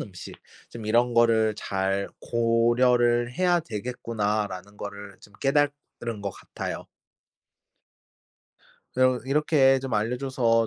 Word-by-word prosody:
음식 90 -4 -8 0.4
좀 115 -2 -8
이런 120 +2 +3
거를 115 -2 +3
잘 95 0 -1
고려를 120 +1 +2
해야 175 +2 +2
되겠구나.'라는 105 - -3
거를 100 -1 -8
좀 105 - -17
깨달은 140 -6 -1
것 100 - -2
같아요. - - -7 2.1
이럼 130 -1 +3
이렇게 135 -1 +3
좀 130 -3 -4
알려줘서 115 0 +1
115 Hz, 220 characters per minute, -26 LUFS, 105-130 Hz, 2.1 s, 이런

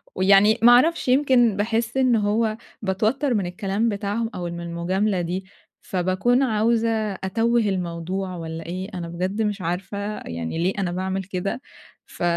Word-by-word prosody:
ويعني 195 +3 +5
ما 240 +1 +8
اعرفش 300 +5 +4
يمكن 250 -5 +4
باحسّ 230 +3 -1
إن 255 -3 +4
هو 215 +1 +1 0.2
باتوتر 220 +8 0
من 200 -4 0
الكلام 195 +5 -1
بتاعهم، 210 +2 -2
أو 180 - -4
من 170 0 -5
المجاملة 180 +3 -1
دي 180 +3 -3 0.4
فباكون 190 +8 +1
عاوزة 230 0 +2 0.2
أتوِّه 225 +6 0
الموضوع، 185 -1 -2
والَّا 165 -1 -6
إيه 185 +4 -5
أنا 175 -2 -5
بجد 185 +5 -2
مش 210 -2 -1
عارفة 180 +4 -3 0.3
يعني 85 - -4
ليه 185 - +1
أنا 180 -3 -1
باعمل 190 +1 -2
كده، 195 +6 -4 0.4
ف - - -8
195 Hz, 150 wpm, -23 LUFS, 180-225 Hz, 0.4 s, ما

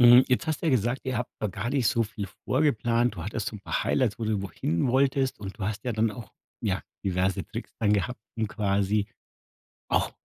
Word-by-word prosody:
Hm, 120 +1 +9
jetzt 130 +6 +2
hast 155 +1 -1
du - - 0
ja - - +4
gesagt, 120 +1 +1
ihr 130 -2 -1
habt 125 - -3
da 105 - +1
gar 105 +6 -3
nicht 135 -5 +2
so 115 -5 +2
viel 105 -2 -4 0.2
vorgeplant. 120 -4 +2
Du 80 - -5
hattest 105 0 -2
so 105 - -7
'n - - -12
paar - - -1
Highlights, 125 -6 +1
wo 115 - -2
du 110 - 0
irgendwo 100 -3 -1
hinwolltest 130 - +1
und 100 +1 -7
du 95 - -2
hast 105 +2 -3
ja 125 - 0
dann 110 0 +2
auch, 105 -3 -9 0.3
ja, - - 0 0.2
diverse 95 0 +1
Tricks - - -7
dann 105 -2 +4
gehabt, 105 +3 0 0.2
um 110 -1 0
quasi 100 0 +1 0.8
auch - - +2
110 Hz, 220 wpm, -27 LUFS, 100-125 Hz, 0.8 s, Hm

